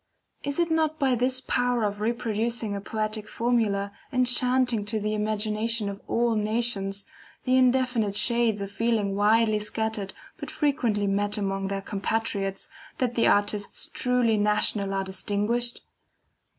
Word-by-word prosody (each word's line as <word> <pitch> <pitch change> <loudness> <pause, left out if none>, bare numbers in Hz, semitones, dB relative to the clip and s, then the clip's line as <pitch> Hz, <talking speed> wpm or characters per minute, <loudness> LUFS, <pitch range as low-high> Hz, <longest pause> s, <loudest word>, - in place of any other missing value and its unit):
Is 285 0 -3
it 340 -1 +1
not 315 -1 +1
by 270 -4 +2
this 255 +2 +1
power 245 -2 +1
of 205 0 -2
reproducing 230 -1 -1
in 200 - -2
a - - -6
poetic 215 0 -3
formula, 220 -4 0 0.2
enchanting 250 -2 +2
to 215 +1 -1
the 215 +1 -2
imagination 215 +1 0
of 200 0 -7
all 235 0 +1
nations, 210 -2 0 0.4
the 255 - +2
indefinite 250 -5 +2
shades 230 -1 +2
of 200 0 -5
feeling 220 -3 0
widely 215 +1 +3
scattered 210 -1 -3 0.2
but - - -7
frequently 235 -9 0
met 205 +1 +1
among 195 -1 -2
their 195 0 -3
compatriots, 200 -1 -2 0.3
that 255 -5 0
the 235 - +2
artists 205 0 0
truly 250 -3 +1
national 210 -1 +1
are 195 0 -1
distinguished? 205 +5 0
220 Hz, 140 wpm, -26 LUFS, 205-240 Hz, 0.4 s, widely